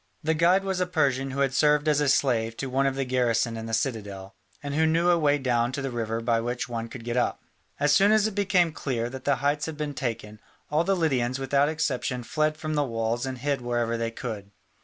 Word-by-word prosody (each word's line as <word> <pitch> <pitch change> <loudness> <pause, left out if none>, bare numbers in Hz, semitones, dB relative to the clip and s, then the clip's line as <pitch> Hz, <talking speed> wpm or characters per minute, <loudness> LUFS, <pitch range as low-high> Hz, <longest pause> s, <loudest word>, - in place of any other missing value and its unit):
The 160 +1 +2
guide 175 +4 +3
was 190 -1 -2
a 180 - 0
Persian 140 -6 +1
who 135 +1 -3
had 135 -1 +1
served 150 +1 +3
as 150 -1 +3
a 145 - +2
slave 115 -4 +1
to 135 -2 -4
one 135 +1 +2
of 135 - -1
the 135 0 -1
garrison 120 -2 +1
in 115 0 -6
the - - -5
citadel, 100 -6 -4 0.3
and 140 0 -4
who 160 +2 +3
knew 170 +2 +3
a 170 - +3
way 145 -2 +3
down 120 -3 0
to 140 - -3
the 135 - -3
river 115 -1 -2
by 115 0 +1
which 120 +1 -3
one 115 -1 -4
could 115 0 -9
get 120 +1 -3
up. 125 - 0 0.4
As 145 0 +3
soon 195 +7 +5
as 215 -1 +4
it 220 - -1
became 190 -4 +2
clear 120 -5 -3
that 130 -1 -8
the 140 - +3
heights 145 +2 +1
had 160 -2 -6
been 150 -1 -3
taken, 115 -5 -4 0.3
all 155 +2 +2
the 195 +2 +1
Lydians 130 -7 0
without 140 +2 +2
exception 130 -5 -2
fled 155 +4 0
from 155 0 -4
the 150 -1 +2
walls 115 0 -2
and 130 -1 -4
hid 140 +1 -1
wherever 120 -1 -1
they 115 0 -1
could. 110 -4 -6
135 Hz, 245 wpm, -26 LUFS, 120-150 Hz, 0.4 s, soon